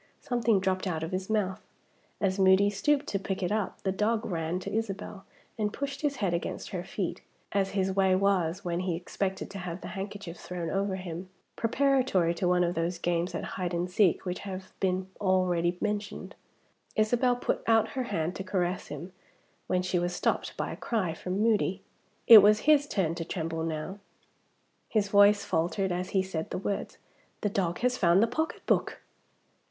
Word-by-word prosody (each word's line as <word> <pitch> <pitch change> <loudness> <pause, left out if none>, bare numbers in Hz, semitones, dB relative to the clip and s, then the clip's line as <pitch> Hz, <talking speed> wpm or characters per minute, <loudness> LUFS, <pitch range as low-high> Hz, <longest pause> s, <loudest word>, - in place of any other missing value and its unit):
Something 235 -5 +1
dropped 190 0 0
out 160 -3 -2
of 160 - -4
his 185 +1 -3
mouth. 200 -4 0 0.6
As 195 -1 0
Moody 190 +1 +5
stooped 285 +8 +1
to 195 - -1
pick 195 0 -3
it 180 - 0
up, 210 -3 -2
the 190 - +1
dog 215 +3 0
ran 165 -1 -2
to 200 - -6
Isabel 205 -2 -4 0.3
and 210 -1 0
pushed 280 +2 -4
his 290 -2 0
head 195 -8 0
against 170 - -3
her 180 -4 -4
feet, 190 -1 -4 0.3
as 195 -1 +1
his 190 0 +1
way 190 -1 +3
was 190 -2 +1
when 170 0 -1
he 180 -2 -1
expected 190 +2 -3
to 200 - -6
have 180 0 -5
the - - -7
handkerchief 195 -3 -6
thrown 175 -1 -5
over 195 0 0
him, 185 0 -6 0.3
preparatory 245 -8 +2
to 175 +1 -1
one 180 0 +3
of 175 0 0
those 170 +1 -1
games 170 +1 -1
at - - -3
hide 180 -2 -3
and 175 +1 -2
seek 190 -2 +3
which 180 0 -3
have 190 -1 -7
been 185 0 0
already 180 -3 +2
mentioned. 210 0 -3 0.6
Isabel 245 +3 +3
put 245 - -1
out 225 -1 +4
her 260 -1 -3
hand 175 -5 -2
to 190 - -4
caress 185 -1 -1
him, 150 +6 -7 0.6
when 180 0 +1
she 180 -1 0
was 175 +1 -1
stopped - - -1
by - - -2
a - - -5
cry 195 -8 -1
from 185 +4 -3
Moody. 205 -4 +1 0.4
It 225 -2 +12
was 210 +1 +5
his 290 -1 +4
turn 180 - 0
to 170 0 -4
tremble 165 -1 -3
now. 165 +5 -4 0.9
His 205 -3 +1
voice 205 0 +5
faltered 185 +3 0
as 180 +1 -2
he 190 -1 +2
said 170 -4 -4
the - - -3
words, 200 +1 -3 0.4
"The 210 - +1
dog 180 -4 -1
has 250 +1 +1
found 175 +3 +5
the - - +6
pocketbook!" 315 +7 -1
190 Hz, 185 wpm, -29 LUFS, 175-210 Hz, 0.9 s, It